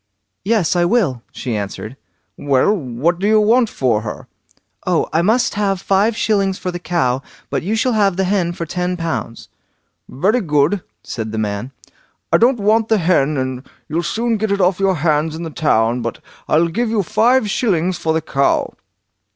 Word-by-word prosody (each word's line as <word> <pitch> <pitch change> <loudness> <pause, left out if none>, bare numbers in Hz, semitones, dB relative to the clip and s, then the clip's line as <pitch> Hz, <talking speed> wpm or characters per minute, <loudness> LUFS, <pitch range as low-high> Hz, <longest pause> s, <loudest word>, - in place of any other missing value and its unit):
"Yes, 205 -3 +1
that 175 - +1
I 175 - +3
will", 175 - +1
she 120 -4 -4
answered. 105 +3 -5 0.4
"Well, 140 - +2
what 150 - -1
do 200 - 0
you 215 0 +5
want 230 +2 +3
for 120 - 0
her?" 105 -1 -7 0.6
"Oh! - - +1
I 165 - +3
must 235 +7 +2
have 200 -2 0
five 200 +4 +1
shillings 195 -3 +1
for 180 - -4
the 175 - -5
cow, 135 -8 0 0.3
but - - 0
you 205 +6 -1
shall 245 +3 +1
have 200 -4 +2
the 190 - +2
hen 185 -2 0
for 170 -1 -5
ten 180 +2 -2
pounds." 165 -8 -4 0.6
"Very 205 - +1
good!" 150 +2 +1 0.2
said 110 -2 -5
the 110 - -4
man; 105 +3 -3 0.6
"I - - +7
don't 245 +2 +4
want 215 +2 +2
the 220 - +3
hen, 155 -5 +2
and 130 -1 -3 0.2
you'll 160 +3 -1
soon 230 +6 -1
get 215 0 -1
it 200 - +1
off 185 0 +2
your 195 -1 +2
hands 155 0 0
in 165 - -6
the 165 - -5
town, 120 -6 +1
but 115 0 -4 0.3
I'll 165 +2 +3
give 230 +7 -1
you 220 -3 +1
five 235 +6 +2
shillings 185 -5 0
for 160 - 0
the 160 0 +1
cow." 140 -3 0
175 Hz, 190 wpm, -18 LUFS, 140-210 Hz, 0.6 s, I